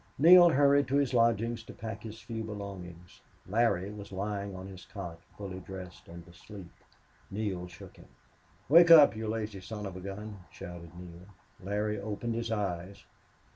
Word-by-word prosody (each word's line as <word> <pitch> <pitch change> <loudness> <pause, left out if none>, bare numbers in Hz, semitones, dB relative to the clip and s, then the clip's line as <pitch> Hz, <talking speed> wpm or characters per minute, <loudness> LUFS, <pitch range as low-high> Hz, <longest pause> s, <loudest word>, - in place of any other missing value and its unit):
Neale 175 +4 +9
hurried 140 -1 +4
to 135 - -1
his 140 -3 +2
lodgings 115 -1 +2
to 115 - -12
pack 110 -2 -6
his 110 0 -9
few 115 -1 -6
belongings. 95 -5 -9 0.3
Larry 100 -2 +1
was 100 -1 -10
lying 100 0 -4
on 95 0 -8
his 95 -1 -10
cot, 85 -5 -8 0.2
fully 95 -2 -6
dressed 95 -1 -10
and 85 +1 -11
asleep. 90 +1 -12 0.6
Neale 95 -3 -3
shook 85 -1 -13
him. - - -16 0.6
"Wake 170 +4 +7
up, 150 -7 +9
you 110 0 -4
lazy 105 -3 -4
son 105 +2 -7
of 95 -2 -6
a 95 - -8
gun!" 100 +2 -7
shouted 85 -1 -10
Neale. 90 0 -11 0.3
Larry 105 +2 -2
opened 110 +3 -4
his 115 0 -3
eyes. 100 -3 -3
100 Hz, 165 wpm, -30 LUFS, 95-115 Hz, 0.6 s, Neale